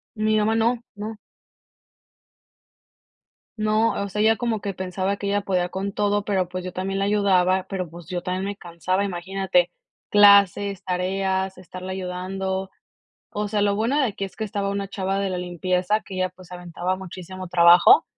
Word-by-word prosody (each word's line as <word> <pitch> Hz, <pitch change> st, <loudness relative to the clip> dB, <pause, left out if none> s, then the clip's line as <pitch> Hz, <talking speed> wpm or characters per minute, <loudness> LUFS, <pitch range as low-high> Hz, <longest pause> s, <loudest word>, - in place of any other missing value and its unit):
Mi 215 Hz, 0 st, +1 dB
mamá 215 Hz, +1 st, +2 dB
no, 230 Hz, +2 st, +2 dB, 0.2 s
no. 215 Hz, +1 st, -6 dB, 2.4 s
No, 215 Hz, 0 st, +1 dB
o 200 Hz, -, -3 dB
sea, 210 Hz, +2 st, -1 dB
ella 220 Hz, 0 st, +4 dB
como 230 Hz, -3 st, -1 dB
que 200 Hz, -, -2 dB
pensaba 190 Hz, +2 st, -2 dB
que 200 Hz, -, -4 dB
ella 205 Hz, 0 st, +1 dB
podía 180 Hz, -2 st, 0 dB
con 195 Hz, +2 st, -4 dB
todo, 205 Hz, 0 st, 0 dB
pero, 190 Hz, -3 st, 0 dB
pues, 185 Hz, 0 st, -5 dB
yo 185 Hz, -, -5 dB
también 195 Hz, +1 st, -3 dB
la 195 Hz, -, +1 dB
ayudaba, 190 Hz, -2 st, +2 dB
pero, 185 Hz, -3 st, -3 dB
pues, 170 Hz, -1 st, -11 dB
yo 180 Hz, -1 st, -3 dB
también 185 Hz, +1 st, -2 dB
me 200 Hz, 0 st, -4 dB
cansaba, 185 Hz, +2 st, -2 dB
imagínate, 185 Hz, -1 st, 0 dB, 0.4 s
clases, 200 Hz, -1 st, +5 dB
tareas, 190 Hz, +1 st, -1 dB
estarla 185 Hz, +1 st, -8 dB
ayudando. 190 Hz, +1 st, -3 dB, 0.6 s
O 210 Hz, 0 st, -3 dB
sea, 210 Hz, -1 st, 0 dB
lo 200 Hz, -1 st, +2 dB
bueno 230 Hz, +7 st, 0 dB
de 280 Hz, -, +3 dB
aquí 195 Hz, -1 st, -4 dB
es 190 Hz, -, -9 dB
que 220 Hz, -, -3 dB
estaba 200 Hz, -1 st, -2 dB
una 200 Hz, 0 st, -2 dB
chava 195 Hz, 0 st, -2 dB
de 195 Hz, -1 st, -1 dB
la 180 Hz, -, -2 dB
limpieza, 180 Hz, +3 st, 0 dB
que 195 Hz, -, -10 dB
ella, 185 Hz, 0 st, +1 dB
pues, 185 Hz, -1 st, -16 dB
se 180 Hz, -, -9 dB
aventaba 175 Hz, +1 st, -3 dB
muchísimo 185 Hz, 0 st, -8 dB
trabajo, 175 Hz, -, +7 dB
190 Hz, 180 wpm, -24 LUFS, 185-205 Hz, 2.4 s, trabajo